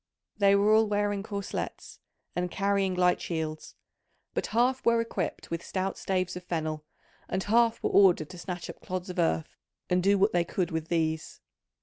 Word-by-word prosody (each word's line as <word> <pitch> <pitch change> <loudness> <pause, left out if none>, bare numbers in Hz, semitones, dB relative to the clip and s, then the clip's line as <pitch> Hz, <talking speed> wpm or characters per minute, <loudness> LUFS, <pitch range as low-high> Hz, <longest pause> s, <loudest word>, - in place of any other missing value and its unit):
They 200 -1 +5
were 205 +2 +4
all 220 0 +5
wearing 205 -1 0
corslets 200 -1 -5 0.4
and 180 0 -1
carrying 195 0 +1
light 180 0 +3
shields, 160 -2 -4 0.6
but - - -1
half 250 +4 +1
were 235 0 +4
equipped 230 -6 -3
with 170 0 -3
stout 190 0 -2
staves 185 -1 -1
of 180 - -7
fennel, 155 -3 -3 0.5
and 190 0 -1
half 230 +2 +3
were - - +1
ordered 180 -6 +5
to 180 - -10
snatch 175 -1 -5
up - - -10
clods 185 0 -4
of - - -5
earth 80 0 0 0.4
and 180 0 +3
do 200 +2 +4
what 200 +3 +3
they 175 -1 +3
could 175 +1 -2
with 160 -1 -3
these. 160 -2 -1
185 Hz, 180 wpm, -28 LUFS, 170-200 Hz, 0.6 s, They